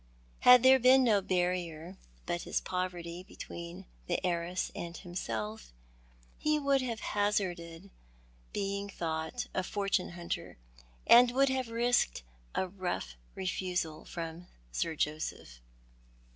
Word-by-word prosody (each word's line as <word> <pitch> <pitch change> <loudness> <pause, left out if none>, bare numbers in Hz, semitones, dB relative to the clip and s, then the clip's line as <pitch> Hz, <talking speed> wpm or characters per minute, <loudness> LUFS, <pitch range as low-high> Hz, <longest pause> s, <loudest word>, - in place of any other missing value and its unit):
Had 250 -1 +8
there 260 0 +8
been 260 +2 +6
no 215 -5 +4
barrier 180 -2 -1 0.3
but 175 - -2
his - - -1
poverty 180 -2 -4
between 175 -1 -8 0.2
the 175 - +1
heiress 175 +1 -1
and 170 0 -6
himself, 110 - -5 0.7
he 305 0 +2
w^ould 280 -2 +2
have 235 -3 -3
hazarded 190 -3 -1 0.6
being 200 0 -2
thought 160 +5 -3
a 185 - +1
fortune 195 -1 -1
hunter, 175 0 -5 0.5
and 245 +1 +8
would 270 +2 +3
have 260 -2 -1
risked 230 - +1 0.3
a 190 - +1
rough 180 - -4 0.2
refusal 180 -4 -2
from 170 +1 -6 0.2
Sir 160 - -1
Joseph. 150 - -3
180 Hz, 115 wpm, -32 LUFS, 170-210 Hz, 0.7 s, Had